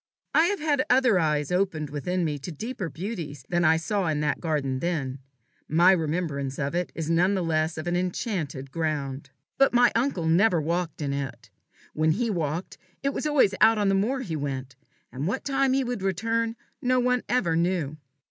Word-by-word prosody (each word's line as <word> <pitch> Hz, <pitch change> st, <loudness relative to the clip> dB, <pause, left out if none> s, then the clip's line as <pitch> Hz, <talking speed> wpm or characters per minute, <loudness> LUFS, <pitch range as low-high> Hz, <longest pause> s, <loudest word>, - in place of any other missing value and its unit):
I 320 Hz, -, +5 dB
have 405 Hz, +3 st, 0 dB
had 295 Hz, -3 st, +1 dB
other 250 Hz, -6 st, +4 dB
eyes 150 Hz, -2 st, 0 dB
opened 180 Hz, -6 st, 0 dB
within 175 Hz, +5 st, -1 dB
me 150 Hz, -2 st, -2 dB
to 175 Hz, -, -6 dB
deeper 200 Hz, -, -5 dB
beauties 160 Hz, -, -6 dB
than 175 Hz, -1 st, +1 dB
I 160 Hz, 0 st, +5 dB
saw 190 Hz, +3 st, -1 dB
in 155 Hz, -2 st, 0 dB
that 150 Hz, -, 0 dB
garden 145 Hz, -5 st, -1 dB
then; 140 Hz, -6 st, -2 dB, 0.5 s
my 170 Hz, +4 st, +5 dB
remembrance 155 Hz, -5 st, -1 dB
of 140 Hz, +1 st, -2 dB
it 175 Hz, 0 st, -1 dB
is 160 Hz, -2 st, -3 dB
none 175 Hz, +4 st, +3 dB
the 185 Hz, -, 0 dB
less 160 Hz, 0 st, 0 dB
of 155 Hz, -, -4 dB
an 175 Hz, 0 st, 0 dB
enchanted 175 Hz, -, -3 dB
ground. 145 Hz, -4 st, -3 dB, 0.3 s
But 275 Hz, -2 st, +4 dB
my 245 Hz, 0 st, +6 dB
uncle 230 Hz, -8 st, 0 dB
never 175 Hz, +3 st, +4 dB
walked 165 Hz, 0 st, -2 dB
in 140 Hz, -1 st, -1 dB
it. 125 Hz, -5 st, -5 dB, 0.4 s
When 155 Hz, +1 st, +2 dB
he 230 Hz, +4 st, -1 dB
walked, 165 Hz, -1 st, -3 dB, 0.2 s
it 275 Hz, 0 st, 0 dB
was -, -, -2 dB
always 280 Hz, -10 st, +4 dB
out 225 Hz, 0 st, +6 dB
on 205 Hz, -1 st, +2 dB
the -, -, +3 dB
moor 230 Hz, +8 st, +1 dB
he 175 Hz, -11 st, -4 dB
went, 135 Hz, -3 st, -4 dB, 0.4 s
and 135 Hz, +5 st, -3 dB
what 230 Hz, +7 st, -2 dB
time 270 Hz, -1 st, +2 dB
he 270 Hz, 0 st, +2 dB
would 245 Hz, -4 st, -3 dB
return 225 Hz, +5 st, 0 dB, 0.3 s
no 255 Hz, 0 st, +2 dB
one 250 Hz, 0 st, +2 dB
ever 195 Hz, -10 st, +2 dB
knew. 165 Hz, -3 st, 0 dB
175 Hz, 195 wpm, -26 LUFS, 150-225 Hz, 0.5 s, my